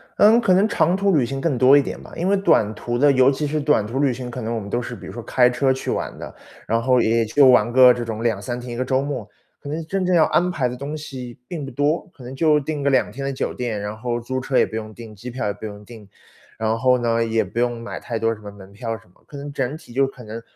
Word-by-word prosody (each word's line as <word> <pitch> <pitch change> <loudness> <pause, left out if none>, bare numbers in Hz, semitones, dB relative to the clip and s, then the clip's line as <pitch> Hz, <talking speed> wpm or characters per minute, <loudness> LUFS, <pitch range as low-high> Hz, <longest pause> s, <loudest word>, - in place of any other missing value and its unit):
嗯， 220 +3 +6
可 190 -5 +3
能 200 +4 +4
长 180 -6 +2
途 195 -2 +2
旅 130 - +3
行 135 +3 -4
更 145 -3 0
多 130 +3 +7
一 - - +5
点 - - -6
吧。 - - -13
因 175 +3 -2
为 200 - +3
短 110 - +3
途 120 +2 -3
的， 145 +3 +5
尤 130 0 +5
其 150 +2 -2
是 150 +1 -1
短 145 -8 +2
途 120 +6 -3
旅 140 -3 +3
行， 125 0 -7
可 125 - -6
能 115 +1 -3
我 - - -1
们 100 - -8
都 120 +4 -1
是 120 - -6
比 - - -11
如 - - -8
说 120 - -6
开 125 +2 +3
车 130 +2 +1
去 130 - -2
玩 - - -3
的。 - - -8 0.3
然 115 +1 0
后 125 0 +3
也 115 +1 +2
就 140 +6 +4
玩 120 -2 +5
个 125 0 +7
这 120 - -4
种 115 -1 -5
2-3 120 +2 -2
天， 120 -1 -7
一 - - -5
个 130 - -1
周 130 +1 +1
末。 135 -7 -5 0.3
可 145 - -9
能 160 +2 -4
真 190 +2 -1
正 180 -1 +2
要 160 - +6
安 180 +1 +2
排 135 -8 0
的 125 - -6
东 145 +3 -5
西， 130 -5 -8
并 155 -5 -5
不 135 - -8
多。 150 - 0
可 135 - -14
能 125 +2 -8
就 150 0 +3
订 150 0 -4
个 140 - +2
2 130 -5 +2
天 135 +5 -7
的 140 - -1
酒 - - -3
店。 120 -4 -3
然 105 +1 -5
后 120 +1 -2
租 130 +2 -3
车 130 0 -1
也 - - +5
不 110 - -9
用 110 -1 -5
订， 110 -2 -11
机 120 +6 -8
票 125 +1 -4
也 100 - -1
不 105 +2 -9
用 105 0 -8
订。 110 -3 -13 0.5
然 110 0 0
后 125 +1 +4
呢， 115 -1 +1
也 115 -1 +1
不 100 +5 -5
用 120 -1 0
买 115 - -6
太 115 - -4
多 115 0 +1
什 105 - -13
么 105 - -8
门 100 -1 -13
票 115 +2 -4
什 110 - -20
么。 - - -30
可 145 - -10
能 145 +1 -7
整 135 +3 -2
体 140 -7 -15
就 135 +1 +2
可 135 -2 -12
能 110 +1 -7
125 Hz, 320 characters per minute, -22 LUFS, 115-145 Hz, 0.5 s, 多